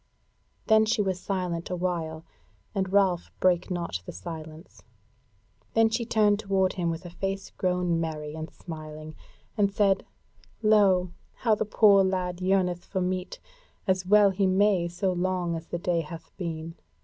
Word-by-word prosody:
Then 220 -1 +5
was 220 - +1
she 195 -3 +1
silent 180 -2 -3
a 180 - -2
while, 170 -3 -3 0.5
and 190 -2 -1
Ralph 190 -3 +2
brake 180 -1 +2
not 170 - -3
the - - -4
silence. 155 - -9 0.9
Then 225 0 +5
she 235 +1 -1
turned 210 -3 +3
to 195 -3 +2
him 175 -2 -1
with 165 +2 -4
a 175 - -8
face 195 +2 -4
grown 180 -2 0
merry 150 -2 -4
and 160 0 -6
smiling, 155 -2 -9 0.4
and 200 -1 +2
said: 200 -2 +2 0.6
"Lo! 195 -4 +4 0.2
how 225 -3 +2
the 215 - 0
poor 205 -2 +5
lad 185 -1 -1
yearneth 185 -2 +1
for 190 - -3
meat, 185 0 -2 0.5
as 185 -2 +1
well 205 +1 +5
he 190 0 +1
may, 190 -2 +3
so 180 +2 -1
long 180 -1 -1
as 165 +1 -7
the - - -3
day 170 -1 0
hath 165 +1 -10
been. 165 -3 -5
185 Hz, 160 wpm, -27 LUFS, 170-195 Hz, 0.9 s, Then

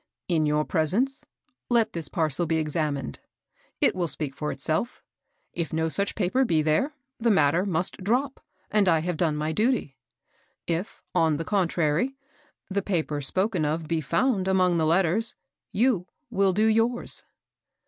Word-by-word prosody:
In 160 -4 +2
your 150 0 +1
presence 220 - +2 0.5
let 235 -2 +2
this 165 -3 0
parcel 160 +1 0
be 160 - +1
examined. 150 - -2 0.6
It - - +4
will 180 -2 0
speak 140 -2 -2
for 150 +1 -3
itself. 155 - -1 0.5
If 170 -3 -3
no 160 0 0
such 200 +5 0
paper 215 +6 +1
be 160 -10 +2
there, 160 - +1 0.2
the 235 0 +2
matter 175 -1 +3
must 180 0 -1
drop, 255 +7 0 0.3
and 205 -3 +3
I 165 -2 +3
have 175 +1 -2
done 155 -2 +1
my 155 +1 -1
duty; 215 - 0 0.7
if, 170 +4 -3
on 160 -2 +2
the 165 - -4
coQtprary, 180 - +1 0.5
the 200 +1 -1
paper 160 -7 -1
spoken 185 +5 0
of 155 +2 -1
be 165 0 0
found 195 - +1
among 185 -2 +3
the 160 -1 +2
letters, 190 +6 +1 0.4
you 215 -5 +1 0.2
will 195 -1 +3
do 210 +4 +2
yours." 225 +2 +1
175 Hz, 155 wpm, -26 LUFS, 155-205 Hz, 0.7 s, It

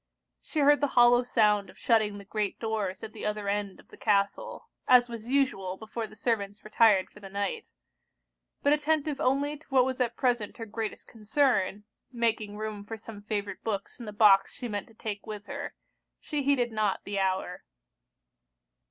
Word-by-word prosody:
She 310 - -2
heard 290 +1 +5
the 285 - +3
hollow 240 0 +7
sound 210 -5 +2
of - - -16
shutting 215 -3 +2
the 200 - -11
great 210 0 -2
doors 215 -4 -2
at 220 - -7
the - - -9
other 210 -1 -2
end 200 -1 -2
of - - -19
the - - -14
castle, 200 -2 0 0.2
as 250 -1 +7
was 230 -1 -8
usual 245 -9 +1
before 220 +1 -5
the 215 - -15
servants 205 -2 -2
retired 215 -3 +4
for - - -15
the 195 -1 -10
night: 200 0 -3 0.9
but 285 - +5
attentive 300 -1 0
only 285 +2 +1
to 315 - -23
what 260 -2 +4
was 260 0 -2
at 240 -1 0
present 245 -5 0
her 225 - -5
greatest 220 0 -5
concern, 215 -3 0 0.3
(making 225 -4 -1
room 215 -1 -5
for 225 +2 -7
some 220 -1 -10
favourite 205 -1 -4
books 205 0 -4
in 235 - -8
the - - -4
box 205 -2 +5
she 245 - -5
meant 205 -3 -4
to 225 - -20
take 210 -1 -6
with 210 -2 -6
her,) 280 0 -6 0.4
she 295 -2 -2
heeded 265 -4 +2
not 215 -3 0
the 200 0 -3
hour. 190 -1 -1
220 Hz, 185 wpm, -28 LUFS, 205-245 Hz, 0.9 s, hollow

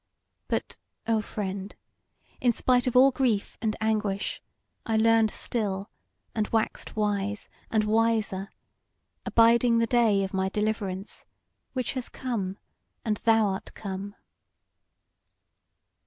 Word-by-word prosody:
But, - - -2 0.3
O 225 -1 +2
friend, 195 -2 -5 0.6
in 245 - +4
spite 250 +2 +2
of 250 - 0
all 265 +2 +7
grief 245 -6 0
and 220 -2 0
anguish, 215 -3 -1 0.4
I 225 -1 0
learned 225 0 +4
still, 205 -3 -3 0.4
and 215 -2 0
waxed 225 -1 -1
wise, 205 -1 -1 0.2
and 220 -1 +2
wiser, 215 -2 +1 0.8
abiding 230 +1 +5
the 230 - +3
day 225 -4 +3
of 195 - -4
my 190 0 +1
deliverance, 210 -2 -3 0.5
which 255 -2 -1
has 255 -2 -4
come, 205 -7 -3 0.5
and 215 -2 +1
thou 225 -1 +4
art 190 -1 -4
come." 200 0 -6
215 Hz, 115 wpm, -27 LUFS, 200-230 Hz, 0.8 s, all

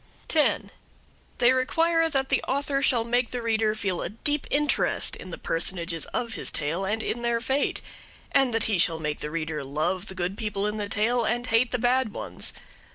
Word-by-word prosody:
10. 310 -2 +2 0.7
They 245 0 +5
require 330 +5 +2
that 270 -3 0
the - - +2
author 275 0 0
shall 245 -4 +3
make 240 +1 +1
the 250 - -3
reader 220 -1 +1
feel 195 -5 -1
a - - -2
deep 290 +7 -2
interest 295 +1 +2
in 185 - -10
the 170 - -6
personages 170 -1 -1
of 235 -2 -3
his - - -2
tale 160 +6 -1
and 220 +3 -1
in 240 - -2
their 235 -1 +1
fate; 265 +4 0 0.5
and 270 -3 +4
that 225 0 +2
he 210 -5 +1
shall 165 -1 +4
make 150 -1 -3
the 150 - -4
reader 155 -2 -3
love 165 +8 -1
the 190 - -7
good 185 +3 -3
people 205 -3 -2
in 210 +1 -1
the 205 -1 -3
tale 235 +4 +1
and 240 +2 0
hate 230 +1 +3
the 250 - -1
bad 245 -1 +2
ones. - - -4
225 Hz, 200 wpm, -26 LUFS, 185-255 Hz, 0.7 s, They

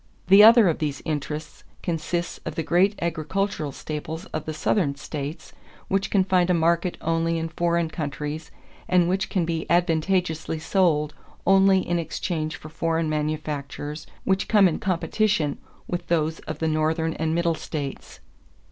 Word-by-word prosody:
The 195 +2 +9
other 225 -1 +8
of 165 - +1
these 150 -3 -3
interests 150 0 -4 0.2
consists 170 +1 -2
of - - -5
the 165 - -1
great 185 +6 +2
agricultural 170 0 -2
staples 155 +4 -6
of 155 - -3
the 155 - -3
Southern 155 -2 +1
states 145 +2 -6 0.4
which 195 0 0
can 195 -2 +3
find 185 -1 +2
a 180 - +4
market 170 +2 +1
only 165 0 0
in 165 0 -3
foreign 170 0 0
countries 150 0 -5 0.4
and 180 -2 +3
which 190 +2 0
can 180 -4 0
be 165 -1 -2
advantageously 170 -1 +1
sold 155 -3 +1 0.3
only 195 0 +5
in 175 0 +1
exchange 160 0 -3
for 155 - -10
foreign 165 0 -1
manufactures 150 0 -3 0.2
which 190 0 +1
come 205 -3 +6
in 170 - -1
competition 190 -4 0 0.3
with 175 - -4
those 160 -1 0
of - - -3
the 160 - -1
Northern 160 +1 0
and 160 0 -1
Middle 170 0 +2
states.... 140 - -6
165 Hz, 155 wpm, -24 LUFS, 155-180 Hz, 0.4 s, The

